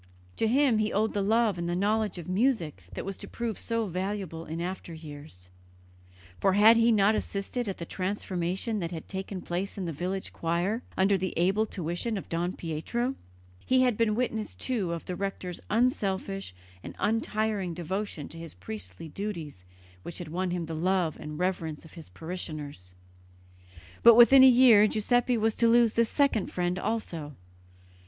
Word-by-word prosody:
To 225 - +2
him 255 -1 +3
he 215 0 0
owed 215 +2 +1
the 205 - 0
love 215 -2 +2
and 170 0 -2
the 175 - 0
knowledge 210 +1 0
of 170 - -7
music 185 - 0
that - - -5
was 195 0 -4
to - - -9
prove 235 -4 -4
so 230 -1 -1
valuable 185 -3 -4
in 160 +2 -4
after 175 -1 -5
years, 145 - -10 0.9
for 195 - +3
had 215 +3 +7
he 230 +1 +4
not 210 -1 +4
assisted 215 +3 -3
at 195 - -4
the 170 - -6
transformation 185 +3 -2
that 170 -3 -3
had 165 -2 -7
taken 190 -1 -5
place 185 +4 -3
in 190 - -3
the 165 - -3
village 185 +6 -4
choir 175 +7 -1 0.2
under 195 +1 +3
the 185 0 -3
able 195 +6 +2
tuition 180 +6 -3
of 195 - -7
Don 175 +2 -1
Pietro? 205 - -2 0.5
He 255 0 +3
had 250 -3 +2
been 215 -1 +1
witness, 225 -3 -2
too, 215 -9 -2
of 170 -1 -4
the 180 - -4
rector's 185 -2 -4
unselfish 195 - 0 0.3
and 85 - -8
untiring 215 -4 -1
devotion 180 -2 -4
to 165 - -10
his 165 -2 -9
priestly 95 - -8
duties 160 - -6 0.4
which 170 - -7
had 175 -4 -6
won 180 +3 -2
him 175 -1 -2
the 165 - -6
love 175 0 +1
and 150 0 -7
reverence 170 -3 -2
of 160 - -15
his 165 -2 -10
parishioners; 150 - -7 1.1
but 235 -1 +9
within 260 +3 +8
a - - +10
year 240 -4 +7
Giuseppe 245 +3 +2
was 220 0 +2
to 235 - +2
lose 230 -1 +5
this 230 -1 +2
second 280 -8 +1
friend 180 +1 -1
also. 165 -11 -3
190 Hz, 175 wpm, -28 LUFS, 170-220 Hz, 1.1 s, a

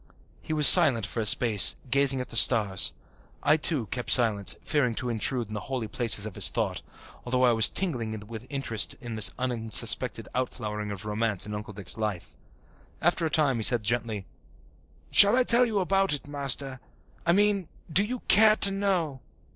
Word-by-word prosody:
He - - -11
was 150 -2 +4
silent 140 - +8
for 115 - -7
a 110 - -1
space, 110 -3 +4 0.2
gazing 140 -1 +2
at 125 - -10
the - - -10
stars. 105 -5 +3 0.5
I 150 - +2
too 150 -5 -1
kept 120 -1 -7
silence, 105 -6 +2
fearing 125 -6 -3
to 125 -1 -6
intrude 115 0 -3
into - - -10
the 105 -1 -8
holy 130 -4 -5
places 110 -1 0
of 110 - -9
his - - 0
thought, - - -5 0.4
although 125 +1 -3
I 125 - +2
was 110 -2 +4
tingling 115 - -4
with 115 +2 -12
interest 135 -6 -2
in 120 -4 -10
this 110 -3 +4
unsuspected 120 -3 +1
outflowering 105 -5 -6
of 100 +1 -9
romance 105 -2 -4
in 105 - -9
Uncle 105 0 -9
Dick's 100 -1 -4
life. 105 -5 -7 0.6
After 170 0 -2
a - - -6
time 140 -4 0
he - - -5
said 120 0 +1
gently, 110 -2 -4 0.9
"Shall 205 +3 +6
I 255 - +1
tell 245 0 +3
you 220 -3 -5
about 195 -1 -1
it, 145 - -7
Master? 140 -2 -4 0.4
I 170 - 0
mean, 200 -2 -1 0.3
do 200 - +3
you 245 +3 -7
care 215 0 +3
to 200 - +7
know?" 185 -8 -4
125 Hz, 185 wpm, -24 LUFS, 110-155 Hz, 0.9 s, silent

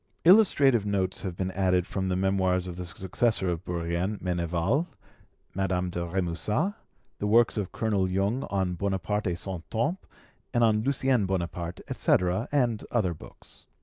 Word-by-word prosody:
Illustrative 145 - +6
notes 95 -2 -1
have 95 -4 -4
been 95 +1 -2
added 90 -2 +1
from 95 -1 -2
the 90 - 0
Memoirs 95 -1 +1
of 90 -2 -6
the 90 0 -6
successor 95 +2 0
of 85 0 -2
Bourrienne, 85 +4 -2
Meneval, 90 - 0 0.7
Madame 90 -2 -1
de 85 - -4
Remusat, 95 - -1 0.5
the 105 - -1
works 115 +2 +4
of 105 -4 -3
Colonel 100 -4 0
Jung 100 +7 0
on 95 -2 -1
'Bonaparte 100 +3 -1
et 90 - 0
Son 95 -1 -4
Temps', 145 +12 -1 0.5
and 120 - +4
on 110 -1 +3
'Lucien 130 -4 +1
Bonaparte', 85 -2 -3
etc., 90 +5 +1
and 120 -7 +1
other 100 -8 +1
books. 75 - -14
95 Hz, 150 wpm, -27 LUFS, 90-110 Hz, 0.7 s, Illustrative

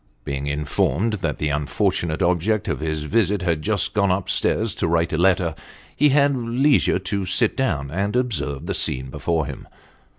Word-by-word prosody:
Being 70 0 -3
informed 75 - 0
that 80 -5 -2
the 75 - -1
\infortunate 75 +2 -1
object 90 +4 +1
of - - -2
his 80 -1 -2
visit 100 +2 +1
had 85 -4 0
just 100 +1 -1
gone 100 -2 +2
up 95 0 -1
stairs 110 -1 +1
to 85 - +2
write 85 0 +1
a - - +2
letter, 90 -1 +2 0.4
he 150 - +4
had 140 0 +3
leisure 125 +2 +2
to 95 +1 -3
sit 95 0 +2
down 75 - -1
and 100 +6 -2
observe 100 - -1
the - - -2
scene 65 0 0
before 80 +2 -1
him. - - -8
90 Hz, 175 wpm, -22 LUFS, 75-105 Hz, 0.4 s, he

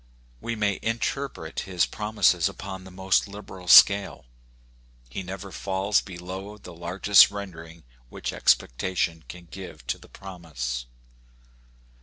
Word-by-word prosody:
We 115 - -3
may 105 -2 0
interpret 115 - -3
his 90 -3 0
promises 105 -6 +1
upon 95 -1 -8
the - - -10
most 95 +2 +1
liberal 100 -2 -10
scale. 100 -6 +7 0.9
He 95 - -4
never 95 +1 -7
falls 95 +2 0
below 95 +2 -8
the 90 -4 -12
largest 90 +4 +5
rendering 85 -5 -9 0.3
which - - -5
expectation 85 +4 +1
can 90 -1 -10
give 90 -9 -10
to - - -3
the - - -17
promise. 75 -11 -6
95 Hz, 120 wpm, -26 LUFS, 85-100 Hz, 0.9 s, scale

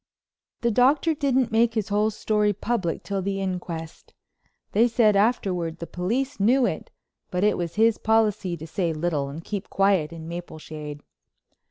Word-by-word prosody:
The 235 -1 +2
Doctor 275 +8 +3
didn't 265 -5 +1
make 225 +1 +3
his 215 -1 -1
whole 210 +1 +2
story 210 -1 +1
public 200 -5 -2
till 200 -1 -2
the 195 +1 -2
inquest. 180 -4 -5 0.6
They 225 +4 +4
said 225 -3 +3
afterward 190 -6 +1
the 170 - -6
police 230 +12 -2
knew 245 +6 +4
it, - - -3 0.4
but 180 +1 -1
it 210 - +3
was 170 -1 -4
his 225 +1 +3
policy 210 -5 +1
to 160 - -8
say 170 0 -1
little 155 -3 -1
and 155 +4 -8
keep 205 0 -5
quiet 195 -6 +2
in 165 -1 -8
Mapleshade. 155 -3 -7
200 Hz, 160 wpm, -25 LUFS, 170-225 Hz, 0.6 s, They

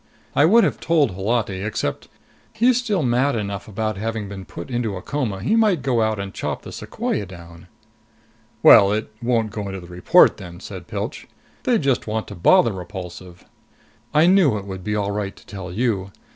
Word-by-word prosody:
I 145 - +5
would 225 +7 +6
have - - 0
told 160 - +2
Holati, 100 0 -1
except 105 -8 -3 0.5
he's 235 +2 +3
still 215 -9 0
mad 125 +3 +2
enough 100 -3 -4
about 110 0 -3
having 110 0 -3
been 95 -1 -8
put 85 +8 -9
into 120 -4 -1
a 90 - -6
coma, 110 -10 -3
he 175 - +2
might 210 - +3
go 125 -4 +1
out 110 -1 0
and 100 0 -5
chop - - -4
the - - -9
sequoia 100 - -3
down." 85 -2 -13 1.0
"Well, 100 0 +8
it 110 +1 -2
won't 115 -3 0
go 105 -1 -5
into 95 0 -5
the 90 - -11
report 90 +1 +4
then," 90 -3 -9
Pilch - - -15
said. - - -6 0.4
"They'd 235 - +2
just 135 -4 +1
want 110 0 -2
to - - -7
bother 100 +5 +4
Repulsive!" 90 -1 -9 0.7
"I 155 +2 +4
knew 175 - +4
it 100 - -7
would 95 -2 -7
be 105 +1 -2
all 100 -1 -1
right 100 -1 -3
to - - -18
tell 95 -3 -8
you. 100 -2 -1
105 Hz, 190 wpm, -22 LUFS, 95-130 Hz, 1.0 s, Well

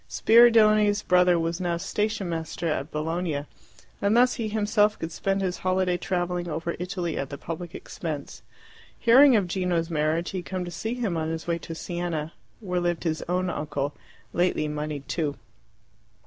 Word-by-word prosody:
Spiridione's 215 -3 +5
brother 180 -1 +4
was 165 +2 -2
now 175 -1 0
station 210 +2 -2
master 165 0 -3
at 155 -2 -1
Bologna, 155 -1 -2 0.6
and 205 +3 +3
thus 250 +1 +5
he 225 - -3
himself 210 0 +2
could 165 - -5
spend 195 +3 -1
his 180 -1 -2
holiday 185 -1 +1
travelling 175 0 -2
over 165 +2 -3
Italy 180 -2 -3
at 135 - -3
the 140 - -6
public 170 +3 -6
expense. 150 -4 -6 0.6
Hearing 260 +3 +7
of 205 -4 +3
Gino's 175 -2 -1
marriage, 155 +2 0
he 190 - -3
had 175 - -9
come 185 -1 -3
to 175 - -6
see 220 +7 -3
him 220 -9 -1
on 160 0 -1
his 160 0 -4
way 170 -1 -1
to 165 - -7
Siena, 170 -2 -3 0.3
where 180 -4 -1
lived 175 -1 -1
his 160 -2 -1
own 180 0 0
uncle, 145 -1 -3 0.4
lately 175 -3 +1
monied 150 -1 -4
too. 150 -5 -2
175 Hz, 170 wpm, -26 LUFS, 160-195 Hz, 0.6 s, Hearing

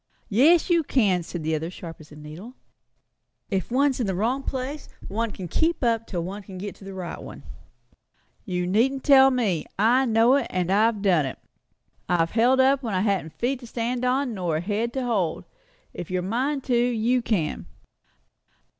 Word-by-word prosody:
"Yes, 300 - +4
you 345 -2 +3
can," 210 - +2
said 170 0 -6
the 160 +1 -1
other, 160 +1 -2
as 175 - -9
sharp 165 -2 -9
as 155 -1 -15
a - - -12
needle. 155 - -10 1.0
"If 190 -2 -1
one's 265 +2 +2
in 235 - 0
the 190 - -1
wrong 235 +8 0
place, 270 +2 -5 0.2
one 230 +3 -2
can 190 -3 -7
keep 320 - 0
up 230 -1 +1
till 175 -4 -3
one 195 +4 -6
can 190 -2 -10
get 200 +2 -5
to - - -15
the 195 0 -8
right 180 -2 -6
one. - - -10 1.0
You 180 -3 -2
needn't 245 +9 +1
tell 270 -2 +7
me. 220 - 0
I 240 +6 +4
know 230 +4 +4
it, - - -2
and 180 0 -1
I've 215 +1 +2
done 175 -8 +3
it. - - -6 0.7
I've 165 -2 +2
held 245 +4 +3
up 265 +1 +4
when 225 -6 -3
I 185 - +1
hadn't 195 -6 -1
feet 250 +2 -1
to 240 - -11
stand 240 +2 -3
upon, 255 0 +1
nor 175 -6 -1
a - - -2
head 215 +5 -2
to 265 -2 -2
hold. 195 -9 -1 0.5
If 175 - -7
you're 185 -1 -1
a - - -4
mind 265 +6 -1
to, 250 - 0
you 240 +1 +2
can. 165 - -2
220 Hz, 200 wpm, -24 LUFS, 185-255 Hz, 1.0 s, tell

